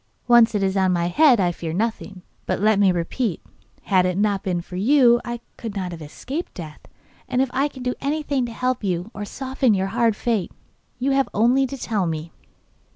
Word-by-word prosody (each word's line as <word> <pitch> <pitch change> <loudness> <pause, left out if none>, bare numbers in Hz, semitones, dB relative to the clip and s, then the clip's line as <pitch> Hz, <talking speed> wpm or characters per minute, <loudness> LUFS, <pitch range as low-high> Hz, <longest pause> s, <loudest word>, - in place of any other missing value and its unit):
Once 235 -2 +6
it 200 - +1
is 190 0 0
on 190 -1 +2
my 175 -1 0
head 270 - +5
I 180 -2 +2
fear 165 -2 -5
nothing. 200 -2 -3 0.2
But - - -1
let 210 0 +3
me 195 -2 +5
repeat; 180 +4 -2 0.4
had 185 -3 +3
it 180 0 -2
not 205 -1 +1
been 180 -2 -1
for 180 - -10
you 240 +3 +4
I 240 0 -5 0.2
could 225 -3 -6
not 185 -3 -3
have 165 -2 -8
escaped 265 - -6
death, 155 -4 -8 0.5
and 250 - 0
if 265 -1 +1
I 275 +3 +2
can 260 -3 -10
do 250 0 -1
anything 285 -3 -1
to - - -7
help 250 +1 -2
you, 180 +2 -2
or 205 -1 -5
soften 260 0 0
your 190 0 -1
hard 230 -2 +2
fate, 220 -4 -1 0.5
you 260 +2 0
have 270 0 +2
only 250 +5 +3
to 275 - -7
tell 210 -7 -1
me. 160 0 -4
215 Hz, 210 wpm, -22 LUFS, 185-255 Hz, 0.5 s, Once